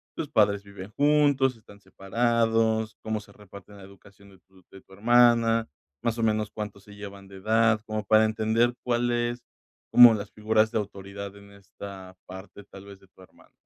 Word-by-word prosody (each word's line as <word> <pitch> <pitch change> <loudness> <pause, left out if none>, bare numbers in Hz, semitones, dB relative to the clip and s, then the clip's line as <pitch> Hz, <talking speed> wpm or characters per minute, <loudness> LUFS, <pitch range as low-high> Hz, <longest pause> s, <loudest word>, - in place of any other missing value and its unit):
¿tus - - -4
padres 100 -1 +1
viven 100 -1 -11
juntos? 145 -3 +2
¿Están 100 -2 -18
separados? 110 +2 -1
¿Cómo 110 -1 -3
se 100 -1 -17
reparten 100 0 -15
la 95 - -13
educación 100 +1 -18
de 95 - -20
tu 95 -1 -23
de 95 - -14
tu 95 - -21
hermana? 115 +1 +3 0.3
Más 115 -1 -2
o 115 - -2
menos, 110 -1 0
¿cuánto 105 -2 -7
se 105 +1 -16
llevan 100 -1 -11
de 95 - -14
edad? 110 +2 +2
Como 110 -1 -4
para 110 +2 +4
entender 110 +2 0
cuál 120 0 0
es 120 0 -2 0.5
como 120 -2 +8
las 100 -1 -7
figuras 110 +1 +1
de 110 - -1
autoridad 100 0 -8
en 100 0 -16
esta 100 -1 -12
parte 95 +2 -12
tal 100 0 -14
vez 100 -1 -13
de 95 - -23
tu 95 - -22
hermano. 95 - -21
105 Hz, 185 wpm, -26 LUFS, 100-115 Hz, 0.5 s, como